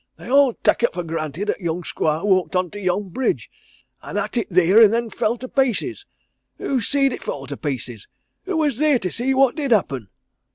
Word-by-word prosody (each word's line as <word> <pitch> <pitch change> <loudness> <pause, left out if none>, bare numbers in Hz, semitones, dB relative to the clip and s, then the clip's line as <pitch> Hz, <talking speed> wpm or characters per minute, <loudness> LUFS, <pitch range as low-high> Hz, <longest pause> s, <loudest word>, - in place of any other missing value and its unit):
"They - - -9
all 275 -2 +5
tak' - - +1
it 240 - +1
for 175 - -2
granted 165 +4 -3
'at - - -7
young 175 -1 -3
squire 155 0 -1
walked 190 -2 +2
on 180 -1 0
to 205 - -7
yon 190 +1 -1
bridge, 255 +9 -2 0.5
an' - - -6
'at - - -2
it 235 - -1
theer 185 +4 +5
and 215 -2 +7
then 230 0 -1
fell 230 +3 0
to 255 - -7
pieces. 270 - -1 0.5
Who 265 -3 -1
see'd 275 +3 +1
it - - -7
fall 135 -1 -5
to 140 - -6
pieces? 125 -8 -5 0.4
Who 375 -3 -2
was 290 -6 0
theer 300 -3 +4
to 185 -6 -4
see 260 +3 -1
what 270 -2 +4
did 290 -3 -2
happen?" 140 - +1
210 Hz, 210 wpm, -21 LUFS, 170-260 Hz, 0.5 s, and